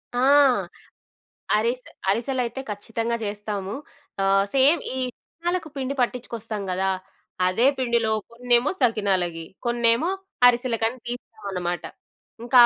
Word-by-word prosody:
ఆ! -, -, +1 dB, 1.4 s
అరిసె 240 Hz, +4 st, -1 dB, 0.2 s
అరిసెలైతే 245 Hz, +4 st, 0 dB
ఖచ్చితంగా 225 Hz, +3 st, -2 dB
జెస్తాము. 205 Hz, -1 st, -3 dB, 0.5 s
ఆహ్, 195 Hz, 0 st, +4 dB
సేమ్ 280 Hz, +5 st, +5 dB
ఈ -, -, -3 dB, 0.2 s
సకినాలకు 345 Hz, 0 st, -4 dB
పిండి 270 Hz, +1 st, -2 dB
పట్టించుకొస్తాం 230 Hz, -3 st, -3 dB
గదా! 190 Hz, +1 st, +1 dB, 0.6 s
అదే 205 Hz, +8 st, +2 dB
పిండిలో 235 Hz, -3 st, +1 dB, 0.2 s
కొన్నేమో 240 Hz, +2 st, +2 dB
సకినాలకి, 190 Hz, -8 st, +1 dB, 0.2 s
కొన్నేమో 235 Hz, +6 st, +2 dB, 0.4 s
అరిసెలకని 240 Hz, -1 st, +1 dB
తీస్తామన్నమాట. 190 Hz, -7 st, -4 dB, 0.6 s
ఇంకా 245 Hz, +2 st, +3 dB
235 Hz, 95 wpm, -24 LUFS, 205-250 Hz, 1.4 s, సేమ్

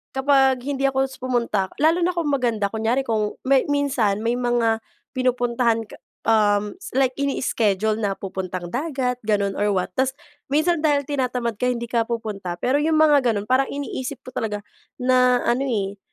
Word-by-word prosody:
kapag 265 Hz, -2 st, +3 dB
hindi 275 Hz, 0 st, 0 dB
ako 265 Hz, 0 st, -1 dB
pumunta 235 Hz, -6 st, 0 dB
lalo 320 Hz, +4 st, +3 dB
na 355 Hz, +1 st, +1 dB
kung 320 Hz, -4 st, 0 dB
maganda, 230 Hz, -7 st, 0 dB
kunyari 225 Hz, +4 st, 0 dB
kung 215 Hz, -3 st, -1 dB
may 265 Hz, +1 st, +3 dB
minsan 255 Hz, -8 st, +1 dB
may 235 Hz, +1 st, +1 dB
mga 235 Hz, -2 st, +1 dB, 0.3 s
pinupuntahan 245 Hz, -2 st, +1 dB
ka -, -, -14 dB, 0.3 s
um, 210 Hz, -2 st, +3 dB, 0.2 s
like 265 Hz, -1 st, +3 dB
ini-iskedyul 220 Hz, -6 st, 0 dB
na 200 Hz, -3 st, -1 dB
pupuntang 185 Hz, -2 st, -5 dB
dagat 260 Hz, -3 st, -2 dB
ganon 200 Hz, -2 st, +1 dB
or 205 Hz, -1 st, +1 dB
what, 185 Hz, -, -1 dB
tapos 265 Hz, +1 st, 0 dB, 0.3 s
minsan 310 Hz, +4 st, +2 dB
dahil 290 Hz, -2 st, +2 dB
tinatamad 250 Hz, -5 st, -2 dB
ka 250 Hz, -, +1 dB
hindi 240 Hz, -1 st, -1 dB
ka 230 Hz, -1 st, 0 dB
pupunta, 210 Hz, -6 st, -4 dB
pero 270 Hz, +4 st, +1 dB
'yong 315 Hz, +1 st, +1 dB
mga 310 Hz, -2 st, +5 dB
gano'n 205 Hz, -1 st, -2 dB
parang 260 Hz, +1 st, +3 dB
iniisip 280 Hz, -2 st, -5 dB
ko 255 Hz, -, -10 dB
talaga 210 Hz, -2 st, -3 dB, 0.4 s
na 250 Hz, -1 st, +3 dB
ano, 260 Hz, +3 st, +1 dB
eh, 200 Hz, -4 st, -2 dB
245 Hz, 165 wpm, -22 LUFS, 215-270 Hz, 0.4 s, mga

